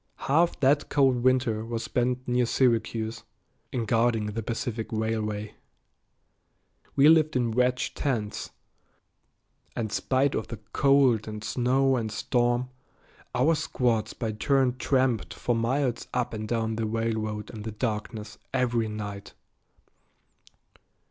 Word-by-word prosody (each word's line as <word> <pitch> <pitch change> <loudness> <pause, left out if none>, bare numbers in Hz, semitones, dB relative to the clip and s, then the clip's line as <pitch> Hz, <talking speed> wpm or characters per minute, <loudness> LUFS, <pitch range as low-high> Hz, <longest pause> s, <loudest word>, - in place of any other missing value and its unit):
Half 165 +5 +2
that 145 +2 +3
cold 135 -3 +3
winter 120 -3 +2
was 115 0 -4
spent 125 +2 -1
near 125 -1 +2
Syracuse, 115 -3 0 0.5
in 120 -3 -2
guarding 115 0 +2
the 105 +2 -3
Pacific 115 0 -3
Railway. 110 -1 -2 1.4
We 140 +1 +6
lived 155 -2 +5
in 120 -2 +1
wedge 125 +2 +1
tents, 115 -8 -2 1.3
and 110 -3 -2
spite 130 +5 +1
of 110 - -2
the 115 - -6 0.2
cold 135 -6 +4
and 105 -1 -6
snow 130 +5 +2
and 110 -2 -2
storm, 120 +3 0 0.7
our 135 +7 +4
squads 120 -8 0
by 115 -3 -3
turn 130 +3 +1
tramped 120 - +1
for 120 +9 -1
miles 120 +2 0
up 125 -2 0
and 110 -1 -4
down 110 -1 -1
the 115 -1 -1
railroad 110 -1 -2
in 110 - -8
the 110 - -5
darkness 105 -2 -4
every 120 -3 +1
night. 105 -2 -6
115 Hz, 125 wpm, -27 LUFS, 110-130 Hz, 1.4 s, We